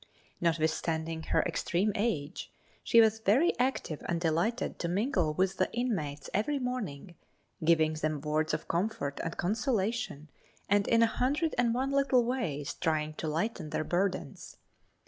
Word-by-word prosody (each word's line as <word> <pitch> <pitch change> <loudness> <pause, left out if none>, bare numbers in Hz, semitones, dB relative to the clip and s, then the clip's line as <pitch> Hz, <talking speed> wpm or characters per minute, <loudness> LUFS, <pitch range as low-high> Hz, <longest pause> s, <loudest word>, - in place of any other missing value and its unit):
Notwithstanding 160 0 0
her - - +2
extreme 195 +5 0
age 170 -10 -2 0.3
she 230 - +5
was 220 -1 +5
very 225 - +3
active 250 - -1
and 170 - 0
delighted 170 +8 0
to 170 - -1
mingle 180 - 0
with 190 +2 +1
the 185 - +1
inmates 160 - -2
every 250 +9 +1
morning, 215 - -4 0.5
giving 160 -1 +4
them 155 -1 -2
words 155 +2 0
of - - -3
comfort 180 -4 -1
and 165 - -4
consolation 215 - -1 0.4
and 200 0 +2
in 230 0 +5
a - - +7
hundred 280 +8 0
and 245 -1 +2
one 265 +2 0
little 275 -3 +3
ways 165 - -2
trying 155 -1 -1
to 160 - -5
lighten 165 +1 -2
their - - -1
burdens. 185 +4 -2
185 Hz, 145 wpm, -30 LUFS, 155-235 Hz, 0.5 s, a